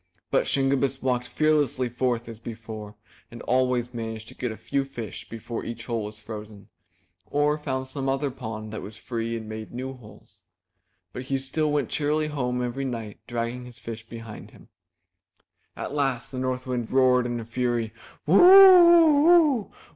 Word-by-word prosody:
But - - +2
Shingebiss 135 0 +1
walked 125 -1 0
fearlessly 145 -2 +1
forth 120 -1 -1
as 115 -2 -9
before, 110 -2 -8 0.3
and 120 - -10
always 125 -1 +1
managed 110 -1 -6
to - - -12
get 125 -2 -4
a 110 - -8
few 125 +5 -1
fish 120 -5 -8
before 115 +1 -6
each 115 0 -7
hole 115 -3 -2
was 105 +1 -8
frozen, 105 -2 -10 0.6
or 145 +1 +1
found 130 -3 -3
some 135 0 -4
other 135 +1 -1
pond 110 -4 -7
that 110 - -5
was 105 +1 -9
free 115 -1 -3
and 110 -1 -8
made 110 0 -7
new 130 +2 -5
holes. 105 -4 -16 0.7
So - - -6
he 135 +1 -2
still 150 +3 -1
went 145 -5 0
cheerily 150 +1 0
home 125 -4 -2
every 125 +3 -3
night 115 -5 -5
dragging 120 +1 -4
his 120 -1 -13
fish 115 -2 -8
behind 115 -2 -9
him. - - -18 1.1
At - - -5
last 135 -4 -1
the 130 - -5
North 130 0 -2
Wind 125 -3 -3
roared 125 -1 +3
in 120 -1 -3
a 115 - -7
fury! 120 -1 -1 0.3
*'Woo 165 +6 +5
oo 345 -5 +8 0.4
oo! - - -29
125 Hz, 170 wpm, -25 LUFS, 115-135 Hz, 1.1 s, oo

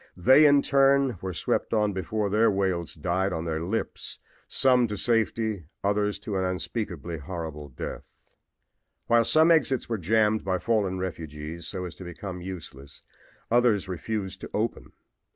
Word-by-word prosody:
They 130 - +7
in 145 -1 +5
turn 135 -5 +3
were 95 - -3
swept 90 - -1
on 105 -1 +2
before 100 +3 -2
their 110 +2 +4
wails 95 -5 -1
died 90 +4 0
on 80 -1 -3
their 80 -1 -2
lips 105 +6 -3 0.3
some 125 -2 +4
to 105 -1 -4
safety, 110 -4 0 0.2
others 105 +1 +1
to 100 -3 -3
an 95 - 0
unspeakably 90 - -3
horrible 80 -2 -6
death. 65 - -6 1.0
While 115 0 +4
some 155 +8 +5
exits 150 -5 +2
were 115 -3 -1
jammed 110 +4 +2
by 95 -1 0
fallen 100 -2 0
refugees 80 -2 -6
so 90 -1 -4
as 85 - -7
to - - -9
become 90 +1 -7
useless, 75 -6 -9 0.5
others 120 -5 +3
refused 95 +1 -4
to - - -7
open. - - -2
95 Hz, 150 wpm, -27 LUFS, 85-115 Hz, 1.0 s, They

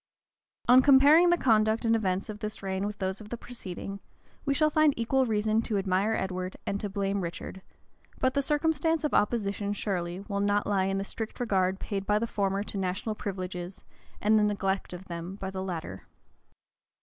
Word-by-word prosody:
On 250 +1 +8
comparing 285 +6 +7
the 345 - +4
conduct 220 -4 +2
and 230 0 +4
events 190 -3 -1
of 210 -1 -7
this 215 -1 -6
reign 190 +1 -1
with 210 0 -6
those 190 +1 -3
of 210 - -11
the 240 - -4
preceding, 200 -5 -7 0.5
we 280 - +2
shall 305 +1 +3
find 310 -2 +4
equal 255 +3 +1
reason 215 0 +1
to 220 -2 -1
admire 195 +2 +1
Edward 185 -1 -3
and 200 - -2
to 205 - -3
blame 195 0 -1
Richard; 175 +2 -6 0.6
but 260 0 +1
the 280 - +2
circumstance 320 +2 +1
of 300 - -1
opposition, 205 -2 +1
surely, 185 -3 -3
will 200 0 -3
not 205 +1 +1
lie 195 -2 +1
in 195 0 0
the 195 - -1
strict 220 +2 -6
regard 190 -5 +1
paid 195 -1 -4
by 210 - +3
the 225 - 0
former 200 -2 -1
to 205 - -5
national 190 +4 -2
privileges, 185 -3 -5 0.4
and 215 +1 +4
the - - +3
neglect 195 -2 -1
of 180 +1 -8
them 170 +2 -6
by 190 -1 -5
the 190 -1 -4
latter. 165 - -5
205 Hz, 190 wpm, -28 LUFS, 190-225 Hz, 0.6 s, On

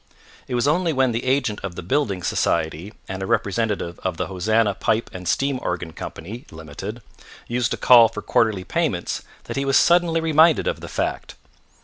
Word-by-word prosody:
It 125 - -3
was 120 +3 +1
only 165 +2 +2
when 130 -2 +2
the 115 +2 -3
agent 130 -5 +1
of 95 -3 -5
the - - -6
building 100 - -1
society 85 +4 -1 0.2
and 95 0 -5
a 95 - -3
representative 105 -5 -1
of 90 -3 -3
the - - -1
Hosanna 105 +3 +1
Pipe 110 +3 -1
and 90 -1 -7
Steam 135 +6 0
Organ 90 -2 -3
Co. - - -6 0.4
(Limited), 80 +9 -8 0.4
used 120 0 0
to - - -2
call 120 -2 +7
for 115 - -7
quarterly 110 -5 +1
payments - - -1 0.2
that - - -6
he 140 - 0
was 135 0 +3
suddenly 170 -1 +4
reminded 160 0 +4
of - - -1
the - - -9
fact. - - -3
115 Hz, 180 wpm, -22 LUFS, 95-135 Hz, 0.4 s, call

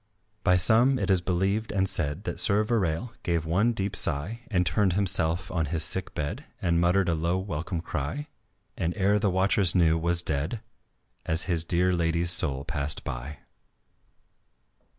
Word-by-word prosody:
By 90 -2 +4
some, 120 +8 +4
it 100 - -1
is 95 -2 +3
believed 95 +5 -1
and 95 -2 0
said, 75 +1 -1
That - - -3
Sir 105 +1 +3
Verale 105 -2 -1
gave 85 -3 -2
one 95 +9 +1
deep 100 -3 -2
sigh 85 +12 -1
And 90 -5 +1
turned 90 +2 +1
himself 85 -3 +1
on 80 -4 -1
his 80 +1 +1
sick 95 +3 +3
bed 85 - -4
And 85 -5 0
muttered 90 +2 +2
a 85 - +1
low 85 +3 -1
welcome 85 -2 -4
cry, 85 - -4 0.5
And 85 +1 -3
ere 100 +1 +2
the 105 -1 +1
watchers 95 0 +2
knew, 80 -2 +3
was 85 +1 +2
dead, 80 +9 -3 0.6
As 80 +1 0
his 85 -3 0
dear 90 +2 +1
lady's 85 0 +1
soul 70 -5 +2
passed 75 0 -3
by. 65 +5 -7
90 Hz, 165 wpm, -26 LUFS, 80-100 Hz, 0.6 s, By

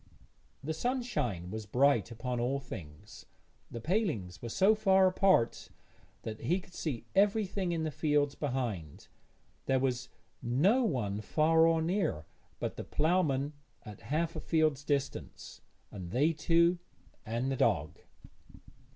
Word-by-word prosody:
The 160 +3 -2
sunshine 160 - -2
was 110 -1 -6
bright 140 +6 +3
upon 120 +1 -4
all 130 +4 0
things; 75 - -10 0.4
the 115 - -6
palings 150 - -1
were 120 - -5
so 195 - +4
far 195 -3 +4
apart 185 -10 +2 0.5
that 110 -1 -6
he 170 +11 +1
could 180 - -17
see 140 -10 -4
everything 200 -2 +2
in 165 -1 -1
the 155 - -2
fields 145 -1 +1
behind; 120 - -4 0.6
there 135 - +3
was 130 -2 -1 0.3
no 160 - +3
one 105 - -1
far 160 +7 +3
or 165 -1 +2
near 165 - -1 0.3
but - - -4
the - - -4
ploughman 150 -4 +1 0.3
at 105 -2 -11
half 165 +3 -1
a - - -3
field's 155 -4 +1
distance, 140 -2 -3 0.3
and 90 -4 -7
they 145 - +2
two, 170 +3 +3 0.4
and 120 +4 -2
the - - 0
dog. 80 - +1
145 Hz, 135 wpm, -31 LUFS, 115-170 Hz, 0.6 s, so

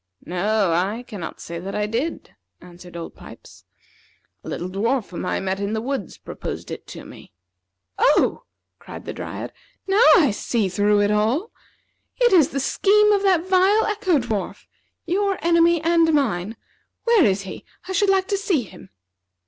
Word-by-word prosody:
"No, 195 +2 0
I 195 +8 -1
cannot 205 -9 -8
say 170 0 -7
that 190 +3 -6
I 210 - 0
did," 240 +10 -4 0.3
answered 175 0 -12
Old 165 - -7
Pipes. - - -15 0.8
"A - - -8
little 175 - -4
dwarf 220 +5 -1
whom 180 - -5
I - - -1
met 190 0 -2
in 200 +1 -2
the 220 - -1
woods 250 -4 -4
proposed - - -7
it - - -8
to - - -10
me." - - -14 0.7
"Oh!" 295 - +2 0.3
cried - - -10
the - - -5
Dryad; - - -7 0.3
"now 390 +3 +2
I 290 -9 +4
see 210 0 -1
through 205 +2 +2
it 205 0 +2
all. 230 - 0 0.7
It 485 -4 +3
is 325 -6 +5
the 275 - -3
scheme 420 +9 +3
of 405 -1 +3
that 370 -4 +2
vile 385 +3 +3
Echo 405 -6 +1
dwarf 225 -6 -4 0.4
your 390 +2 0
enemy 335 0 +4
and 330 -1 +3
mine. 225 - 0 0.5
Where 465 -6 +4
is 195 -4 +2
he? 190 - -9 0.2
I - - -5
should 390 +2 +2
like 380 -1 +2
to 400 - +1
see 380 -9 0
him." 100 - -14
250 Hz, 170 wpm, -22 LUFS, -, 0.8 s, is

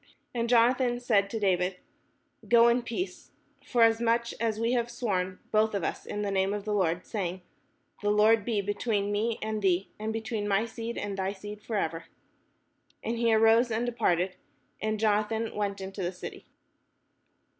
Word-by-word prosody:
And 235 -1 -1
Jonathan 245 +1 +3
said 210 -5 +2
to 225 - -3
David, 185 -2 +1 0.4
" - - -25
Go 235 0 +7
in 240 +1 +2
peace, 235 - -5 0.3
forasmuch 230 0 +2
as 220 -2 0
we 230 +1 +1
have 240 -1 +1
sworn 190 -6 -2
both 215 0 +2
of 195 - -1
us - - -3
in 210 - -3
the 200 - -1
name 195 +1 +1
of 205 -1 -6
the 210 - -1
Lord, 180 -3 0
saying, 185 -4 -3 0.6
'The 205 - 0
Lord 210 +1 +4
be 215 -2 0
between 205 0 -1
me 220 +2 0
and 215 0 -2
thee, 190 -1 +1
and 215 +1 -2
between 220 -1 -3
my 200 +2 +2
seed 230 0 -6
and 205 -1 -3
thy 190 +1 -1
seed 205 +1 -9
for 220 - -5
ever.'" 165 -3 -2 1.0
And 230 +1 -2
he 235 -1 +3
arose 225 +2 +5
and 225 +2 -1
departed: 185 -6 0 0.4
and 215 0 -1
Jonathan 220 +1 +1
went 200 -1 -2
into 195 +1 -6
the 175 0 -1
city. 180 - -9
215 Hz, 175 wpm, -29 LUFS, 200-230 Hz, 1.0 s, Go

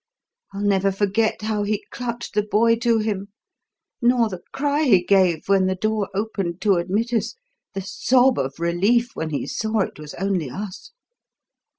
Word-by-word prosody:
I'll 200 +1 -5
never 195 -1 +2
forget 205 +3 0
how 215 -1 -1
he 205 0 -2
clutched 235 -1 -5
the 210 - +2
boy 220 +2 +3
to 235 -1 +2
him 210 -3 -2 0.7
nor 240 -2 +3
the 185 -3 -7
cry 290 +1 0
he 195 -9 +5
gave 180 -4 +2
when 195 -1 +3
the 185 - 0
door 215 +1 -1
opened 195 -4 -2
to 200 -4 +3
admit 205 +7 -1
us, 230 - -1 0.4
the 195 - -2
sob 245 +6 +2
of 135 +3 -3
relief 200 +9 +1
when 160 - -3
he 145 - -2
saw 220 -1 -1
it 185 - -4
was 150 -1 -9
only 185 -6 -1
us. 195 - -7
205 Hz, 170 wpm, -22 LUFS, 185-225 Hz, 0.7 s, he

